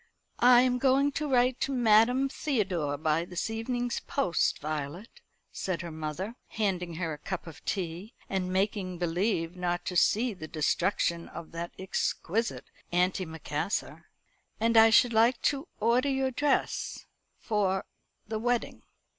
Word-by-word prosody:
"I 245 0 +7
am 250 -1 +2
going 275 +2 +3
to 300 +1 -3
write 250 -1 +3
to 275 - -1
Madame 245 +2 +4
Theodore 190 - -1
by 155 +2 +1
this 180 +5 -4
evening's 240 +2 -2
post, 180 - 0
Violet," 155 - -5 0.3
said 185 -2 -3
her 170 - -6
mother, 160 +7 -4
handing 180 -6 -2
her 165 -2 -2
a 150 - -8
cup 185 +4 -5
of 165 -3 -11
tea, 180 +3 -4
and 185 -1 -2
making 190 -1 -1
believe 175 0 -1
not 175 -1 -2
to 180 - -3
see 225 +7 +3
the 155 -5 -8
destruction 170 +2 0
of 165 - -9
that 170 +1 -5
exquisite 190 +3 -2 0.3
antimacassar; 175 -2 -1 0.5
"and 230 +1 +2
I 225 0 +8
should 235 +1 +5
like 230 +3 +4
to 285 +3 0
order 240 +5 +2
your 265 -1 0
dress 285 +2 -1 0.3
for 195 -4 0 0.4
the 220 0 -3
wedding. 240 +1 -1
195 Hz, 140 wpm, -29 LUFS, 170-245 Hz, 0.5 s, I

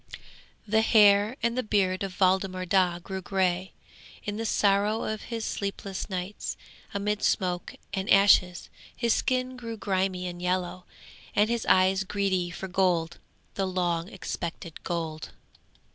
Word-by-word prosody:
'The 220 +2 +3
hair 210 0 +5
and 235 0 +1
the 255 - +1
beard 195 -4 +1
of 195 -2 -4
Waldemar 185 -1 +2
Daa 180 -1 +2
grew 190 +2 -6
grey, 185 -1 0 0.5
in 205 0 -4
the 225 0 -2
sorrow 205 +2 +2
of 215 -1 -4
his 230 -2 -4
sleepless 200 -1 -4
nights, 185 +2 -4 0.3
amid 205 +1 -1
smoke 180 -2 0 0.2
and 190 -1 -2
ashes. 195 -3 +5 0.3
His 235 -2 +1
skin 255 0 0
grew 230 -2 -6
grimy 190 -2 -1
and 175 -1 -6
yellow, 180 0 -2 0.5
and 210 +2 +3
his 235 -1 -2
eyes 190 +1 +4
greedy 190 -3 0
for 185 +2 -6
gold, 175 -3 +1 0.3
the 195 -1 -1
long 175 -1 -1
expected 170 -2 -6
gold. 160 -2 -4
190 Hz, 140 wpm, -27 LUFS, 180-205 Hz, 0.5 s, hair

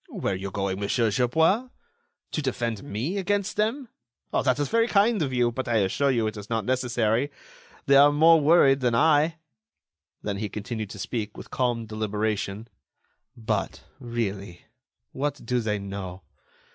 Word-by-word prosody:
"Where - - -2
are - - -1
you 95 +1 -5
going, 95 -1 -2
Monsieur 110 +2 +1
Gerbois? 160 - +2 0.6
To 155 - -2
defend 120 -5 -2
me 125 - -3
against 200 +1 -1
them! 235 +5 -1 0.4
That 130 -2 +1
is 145 -1 0
very 230 0 +2
kind 210 0 +3
of 140 -4 -1
you, 120 -2 +2
but 130 +2 -4
I 120 - 0
assure 110 +7 +2
you 120 -4 +1
it 110 0 -3
is 105 0 -9
not 115 -3 -1
necessary. 125 0 0 0.6
They 140 - +4
are 145 +1 +7
more 160 +2 +6
worried 140 -3 +5
than 120 -3 +1
I." 155 +4 +3 0.9
Then 100 -1 -2
he 105 0 -3
continued 110 0 -5
to - - -9
speak, 110 +1 -4
with - - -11
calm 120 -3 0
deliberation: 110 0 -3 0.7
"But, 110 -2 -3 0.2
really, 105 -7 -4 0.5
what 145 +2 -3
do 125 +1 0
they 110 -2 -1
know? 95 -2 -7
120 Hz, 160 wpm, -26 LUFS, 105-145 Hz, 0.9 s, are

